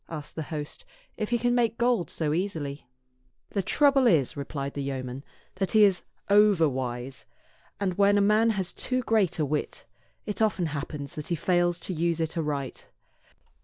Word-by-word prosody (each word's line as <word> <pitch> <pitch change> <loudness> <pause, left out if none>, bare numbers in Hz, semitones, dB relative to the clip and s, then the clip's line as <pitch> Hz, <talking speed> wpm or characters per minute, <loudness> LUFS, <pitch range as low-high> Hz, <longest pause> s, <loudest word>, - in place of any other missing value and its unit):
asked 155 -3 -7
the 160 - -3
host, 150 -3 -5 0.3
"if 215 - -3
he 240 - +2
can 245 +1 +1
make 235 -2 +1
gold 235 -6 +1
so 150 -2 -1
easily 155 -7 -3 0.3
?" 125 -1 -43
"The 200 - 0
trouble 275 +5 +4
is," 155 - +3
replied 140 -1 -4
the 140 - -4
yeoman, 135 -1 -4 0.3
"that 195 +2 -1
he 215 -1 +7
is 195 -3 +4 0.3
overwise; 135 -11 +2 0.5
and 190 -3 -1
when 200 0 +5
a - - +4
man 210 +3 +4
has 195 -4 -1
too 255 0 -2
great 220 -6 +2
a 155 - +1
wit, 150 +1 -3 0.4
it 210 +1 -3
often 205 -5 +2
happens 145 -1 -5
that 150 - -6
he 170 - 0
fails 175 +1 +1
to 185 - -3
use 170 0 0
it 160 -1 -2
aright." 145 -5 -3
170 Hz, 175 wpm, -27 LUFS, 145-210 Hz, 0.5 s, he